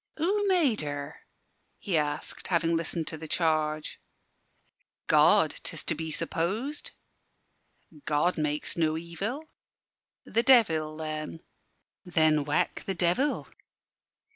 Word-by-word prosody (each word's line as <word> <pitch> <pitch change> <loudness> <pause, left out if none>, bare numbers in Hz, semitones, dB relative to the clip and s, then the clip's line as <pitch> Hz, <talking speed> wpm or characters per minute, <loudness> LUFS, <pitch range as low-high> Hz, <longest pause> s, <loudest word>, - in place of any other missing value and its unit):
"Who 400 +6 +1
made 325 - +3
her?" 145 0 -5 0.6
he 195 -5 -2
asked, 150 -1 -2
having 170 -2 +2
listened 165 0 -2
to 160 - -7
the 160 - -7
charge. 155 -2 0 1.0
"God, - - +4
'tis - - -5
to - - 0
be 160 +1 -5
supposed." 205 - -2 1.2
"God 150 +4 +2
makes 150 -1 -2
no 160 -2 +1
evil." 195 - -4 0.8
"The 230 - +1
Devil, 165 -12 +4
then." 155 0 -5 0.6
"Then 155 -5 +2
whack 150 +1 0
the 195 - -1
Devil." 180 +13 +1
165 Hz, 110 wpm, -28 LUFS, 155-205 Hz, 1.2 s, God